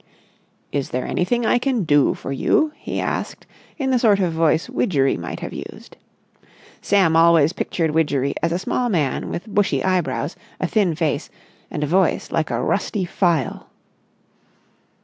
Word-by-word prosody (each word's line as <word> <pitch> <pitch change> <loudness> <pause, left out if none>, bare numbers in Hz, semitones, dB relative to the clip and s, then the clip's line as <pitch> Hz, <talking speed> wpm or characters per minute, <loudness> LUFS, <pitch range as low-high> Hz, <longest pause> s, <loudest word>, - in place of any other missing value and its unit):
"Is 140 -2 -2
there 125 0 -2
anything 235 +7 0
I 245 - +3
can 250 -4 0
do 145 -3 +3
for - - -7
you?" 305 - +2
he - - -5
asked - - -3 0.3
in 270 -4 -1
the 255 - +3
sort 210 -4 +4
of 180 -4 0
voice 160 0 +2
Widgery 135 -6 +1
might 85 -1 -6
have - - -6
used. - - -9 0.9
Sam 190 -5 +3
always 165 -1 +5
pictured 165 -4 -1
Widgery 145 -3 +1
as 170 - 0
a 170 - +1
small 245 +6 -1
man 150 - -1
with 175 - -5
bushy 205 -2 0
eyebrows, 185 -2 -1 0.2
a - - 0
thin 195 -7 +1
face, 155 -2 -1 0.4
and 150 -3 -3
a - - +2
voice 180 +4 +1
like 160 -2 0
a 120 -2 -1
rusty 200 +2 -1
file. 170 - -1
170 Hz, 160 wpm, -21 LUFS, 150-200 Hz, 0.9 s, always